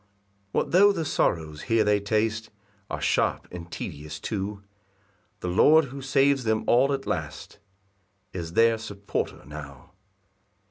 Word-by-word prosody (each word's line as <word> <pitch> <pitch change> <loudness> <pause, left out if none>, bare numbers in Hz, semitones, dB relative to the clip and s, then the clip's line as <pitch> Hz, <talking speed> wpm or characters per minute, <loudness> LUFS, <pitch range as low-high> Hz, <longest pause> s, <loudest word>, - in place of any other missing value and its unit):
4 - - +2
What - - -11
tho' 200 +4 +6
the 165 -5 -2
sorrows 80 - 0
here 115 -1 +4
they 105 0 +3
taste 110 +1 -1 0.4
Are - - -3
sharp - - +1
and 85 -1 -9
tedious 75 +2 -6
too, 100 +1 -4 0.8
The - - -3
Lord, 150 - +5
who 140 - -7
saves 135 0 +2
them 110 -1 +1
all 130 +4 +4
at 135 -1 -2
last, 80 -4 -5 0.7
Is 85 -2 -5
their 115 +2 +4
supporter 100 -2 -4
now. 75 +3 -10
105 Hz, 140 wpm, -26 LUFS, 85-130 Hz, 0.8 s, tho